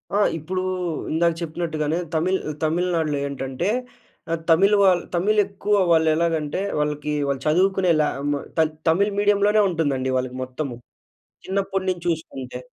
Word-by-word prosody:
ఆ! - - +3 0.2
ఇప్పుడు 185 +4 -3 0.5
ఇందాక 170 +2 +2
చెప్పినట్టుగానే, 160 -1 -2 0.2
తమిళ్ 185 +4 +1 0.2
తమిళనాడులో 165 -2 0
ఏంటంటే 135 +5 -3 0.6
ఆ - - +2 0.2
తమిళ్ 190 +6 +5
వా 195 - +6 0.3
తమిళ్ 210 +5 +2
ఎక్కువ 200 +1 -3 0.2
వాళ్ళు 160 -1 +4
ఎలాగంటే 160 0 0 0.2
వాళ్ళకి 150 0 -1 0.2
వాళ్ళు 140 -1 -2
చదువుకునే 185 +3 +3
లా 150 - +3 0.2
మ - - +2 0.2
త - - +5 0.3
తమిళ్ 195 +6 +3
మీడియంలోనే 205 +1 +3
ఉంటుందండి. 145 -6 -1
వాళ్ళకి 130 0 -2
మొత్తము 130 0 -5 0.7
చిన్నప్పటి 195 0 -1
నుంచి 175 -2 -3
చూసుకుంటే. 135 -7 -4
165 Hz, 130 wpm, -23 LUFS, 150-190 Hz, 0.7 s, వా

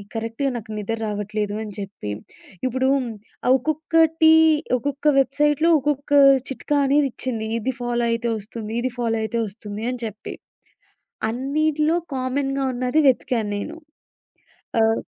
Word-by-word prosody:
కరెక్ట్‌గా 230 +5 -2
నాకు 220 -1 -9
నిదరావట్లేదు 210 -1 -3
అని 210 -2 -8
చెప్పి 195 - -6 0.6
ఇప్పుడు 260 +1 0 0.6
ఆ - - +4
ఒక్కొక్కటి 320 +3 +3 0.4
ఒక్కొక్క 285 +4 -3
వెబ్‌సైట్‌లో 295 +4 +2
ఒక్కొక్క 290 +1 -2 0.4
చిట్కా 290 +2 -1
అనేది 285 0 +3
ఇచ్చింది. 225 -4 -3
ఇది 255 +4 -2
ఫాలో 240 -1 0
అయితే 230 0 -1
వస్తుంది, 215 +1 -7
ఇది 255 0 -1
ఫాలో 225 -1 0
అయితే 235 +2 -2
వస్తుంది 205 +1 -8
అని 250 - -5
చెప్పి, 215 0 -7 1.0
అన్నిట్లో 305 +6 +1 0.2
కామన్‌గా 270 +1 -1
ఉన్నది 255 +4 0
వెతికాను 240 -4 +1
నేను. 310 +11 -6 1.1
ఆహ్ 225 0 +2
250 Hz, 120 wpm, -22 LUFS, 220-285 Hz, 1.1 s, ఆ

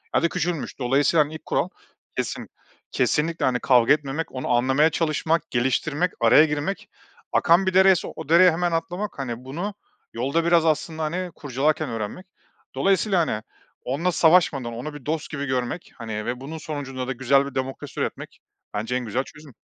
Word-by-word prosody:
ya - - +3
da 170 - +3
küçülmüş. 165 -3 -3
Dolayısıyla 140 +5 +3
ilk 160 - -9
kural - - 0 0.5
kesin - - -3 0.4
kesinlikle 165 +3 +1
hani 125 -1 +1
kavga 125 +1 +5
etmemek, 150 +2 -3
onu 130 0 -5
anlamaya 130 +6 +3
çalışmak, 160 0 0
geliştirmek, 145 +7 0
araya 120 +7 +7
girmek. 150 +6 -3 0.4
Akan 175 +3 +4
bir 190 - 0
dereyse 190 -1 +5
o 145 - -8
dereye 175 +1 +7
hemen 175 +2 0
atlamak. 175 +2 -3
Hani, 125 -1 -5
bunu, 175 +10 -4 0.4
yolda 140 +8 0
biraz 170 -1 +4
aslında 160 0 0
hani 175 +3 -3
kurcalarken 145 +2 -1
öğrenmek. 115 - -5 0.5
Dolayısıyla 195 -1 +2
hani 105 - -2 0.4
onunla 155 +8 0
savaşmadan 160 -9 +3
onu 130 +6 -6
bir 145 -4 -11
dost 155 +1 -2
gibi 145 -1 -3
görmek 130 +4 -3
hani 110 -3 -5
ve 125 +1 -3
bunun 155 +4 -6
sonucunda 135 -5 -5
da - - -2
güzel 135 +2 +3
bir 140 - -8
demokrasi 130 0 -4
üretmek - - -5 0.3
bence 110 +4 -2
en 125 - -2
güzel 125 +4 -1
çözüm. 150 -3 -14
150 Hz, 165 wpm, -24 LUFS, 130-165 Hz, 0.5 s, araya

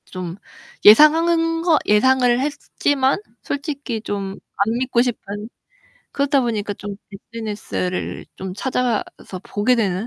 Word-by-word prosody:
좀 180 -2 -6 0.5
예상한 330 +7 +6
거 330 -2 +4
예상을 245 +3 +4
했지만 285 0 0 0.2
솔직히 280 -5 -4
좀 200 -2 -4 0.2
안 220 +3 -1
믿고 250 -1 +1
싶은, 215 -3 -4 0.6
그러다 280 0 +2
보니까 215 -4 -2
좀 205 0 -7 0.2
SNS를 205 -3 -4
좀 190 -1 -6
찾아서 250 -1 0 0.4
보게 210 +6 +1
되는. 205 -3 0
235 Hz, 235 characters per minute, -21 LUFS, 205-280 Hz, 0.6 s, 예상한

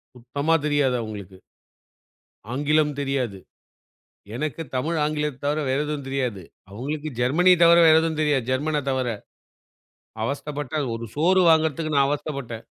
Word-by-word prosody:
சுத்தமா 140 +6 -2
தெரியாது 145 -4 +2
அவங்களுக்கு. 100 -4 -8 1.2
ஆங்கிலம் 150 +2 +1
தெரியாது. 135 -7 -2 1.0
எனக்குத் 155 +2 -4
தமிழ், 160 +6 -1
ஆங்கிலத்த 150 -3 -2
தவர 150 +2 0
வேற 135 - +1
எதுவும் 150 -2 -4
தெரியாது. 125 -8 -2 0.3
அவங்களுக்கு 145 +8 -5
ஜெர்மனி 170 +9 +4
தவர 170 0 +7
வேற 160 0 +7
எதுவும் 160 -1 -2
தெரியாது. 145 -5 +1
ஜெர்மன 150 +3 0
தவர. 130 -1 -1 1.2
அவஸ்தப்பட்டேன், 145 +1 -3
ஒரு 115 0 -6
சோறு 185 +5 +4
வாங்குறதுக்கு 160 -1 +1
நான் 140 -1 +4
அவஸ்தப்பட்டேன். 140 -6 -4
145 Hz, 120 wpm, -24 LUFS, 130-155 Hz, 1.2 s, தவர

